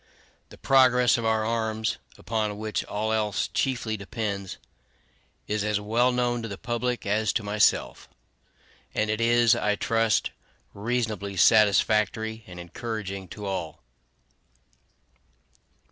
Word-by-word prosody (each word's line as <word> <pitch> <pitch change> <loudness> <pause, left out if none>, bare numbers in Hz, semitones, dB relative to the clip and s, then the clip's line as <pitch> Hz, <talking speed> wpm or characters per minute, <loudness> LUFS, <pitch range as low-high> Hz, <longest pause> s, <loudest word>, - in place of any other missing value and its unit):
The - - -14
progress 125 -2 +4
of 115 - -3
our 110 -1 +1
arms, 110 -1 -1 0.2
upon 110 -2 -2
which 110 0 -2
all 110 +2 -2
else 105 -2 0
chiefly 120 -4 -1
depends, 100 -2 -4 0.9
is 105 0 -1
as 105 -1 0
well 115 +4 +2
known 120 -1 0
to 115 - -5
the 100 -2 -7
public 120 +1 -2
as 105 +2 +1
to 110 - -1
myself; 105 +1 +1 0.9
and 110 0 +1
it 110 +1 -2
is, 120 0 +4
I 105 0 0
trust, 115 0 +1 0.4
reasonably 105 -3 -2
satisfactory 110 +1 +3
and 90 -1 -10
encouraging 100 +1 -6
to 105 +4 -8
all. 95 -5 -4
110 Hz, 120 wpm, -26 LUFS, 105-115 Hz, 0.9 s, progress